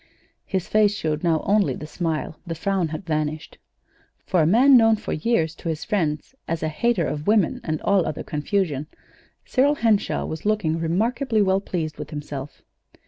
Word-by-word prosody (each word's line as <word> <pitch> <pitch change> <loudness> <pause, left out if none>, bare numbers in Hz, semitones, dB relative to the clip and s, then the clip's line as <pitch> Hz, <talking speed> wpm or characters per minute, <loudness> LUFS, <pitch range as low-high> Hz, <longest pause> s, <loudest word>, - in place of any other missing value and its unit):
His 190 -2 -2
face 210 -1 +3
showed 155 -4 -2
now 165 -2 +1
only 205 0 +2
the 150 - -7
smile; 160 -1 -3
the 165 - -3
frown 190 +1 0
had 155 +4 -6
vanished. 155 -1 -3 0.7
For 180 -4 +2
a 155 - +3
man 255 +9 +6
known 225 -2 +6
for 215 - -5
years 160 -3 0
to 165 - -6
his 160 -1 -3
friends 165 -4 -1
as 165 -1 -2
a 155 - 0
"hater 195 +2 +1
of 150 +1 -4
women 210 -5 +2
and 155 -1 -2
all 200 -3 +2
other 155 - -4
confusion," 150 -2 -1 0.6
Cyril 280 +3 +2
Henshaw 225 -6 +1
was 160 - -6
looking 205 -7 0
remarkably 220 - +1
well 190 0 +2
pleased 160 -6 -4
with - - -6
himself. 145 -2 -7
170 Hz, 175 wpm, -23 LUFS, 155-210 Hz, 0.7 s, man